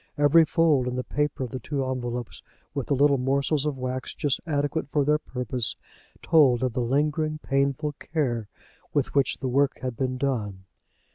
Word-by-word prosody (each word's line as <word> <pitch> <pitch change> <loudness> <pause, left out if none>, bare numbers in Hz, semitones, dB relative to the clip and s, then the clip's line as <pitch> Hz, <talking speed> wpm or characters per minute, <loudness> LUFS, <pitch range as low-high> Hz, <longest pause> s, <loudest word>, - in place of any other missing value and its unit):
Every 145 +3 +6
fold 155 -6 +2
in 125 - -2
the 125 - -2
paper 150 -1 -1
of 125 - -5
the 130 - -4
two 135 +2 -2
envelopes, 125 -2 -4 0.3
with 140 -3 -3
the 140 - +2
little 140 0 +4
morsels 140 +3 +1
of 145 -3 -2
wax 130 0 -4
just 145 -3 0
adequate 145 0 -1
for 145 -1 +1
their 150 +1 +3
purpose, 125 -4 -3 0.5
told 135 -7 +4
of 130 -3 0
the 125 - -1
lingering 150 +5 0
painful 140 +2 0
care 125 -9 -2 0.5
with 145 -3 +1
which 140 -2 +2
the 130 - -3
work 140 +2 +2
had 130 -2 -2
been 130 +2 -2
done. 105 -8 -2
135 Hz, 180 wpm, -26 LUFS, 125-145 Hz, 0.5 s, Every